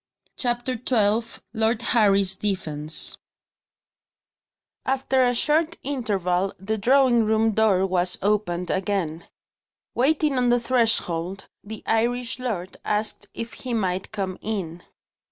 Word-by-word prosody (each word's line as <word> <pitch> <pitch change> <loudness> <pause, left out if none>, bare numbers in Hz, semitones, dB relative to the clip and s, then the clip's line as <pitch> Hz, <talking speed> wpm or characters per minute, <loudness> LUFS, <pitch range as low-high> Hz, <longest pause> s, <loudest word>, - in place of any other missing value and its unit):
CHAPTER 245 0 -1
XII 225 -1 +1
LORD 225 +1 +1
HARRY's 200 -5 +3
DEFENCE 160 -7 -2 1.6
AFTER 265 0 +1
a 245 0 +2
short 310 +6 +1
interval, 195 -8 -1
the 215 +4 -3
drawing 250 +1 +4
room 220 +1 +2
door 205 -3 +3
was 180 -1 +1
opened 180 -4 0
again. 185 -4 -2 0.7
Waiting 285 +1 +2
on 245 -1 +2
the 245 0 +4
threshold, 200 -7 0
the 215 +1 -8
Irish 240 +2 0
lord 200 -8 -4
asked 210 +1 -2
if 230 0 -5
he 250 -2 -4
might 190 -3 -1
come 195 -4 -4
in. 180 -6 -4
220 Hz, 115 wpm, -24 LUFS, 190-245 Hz, 1.6 s, drawing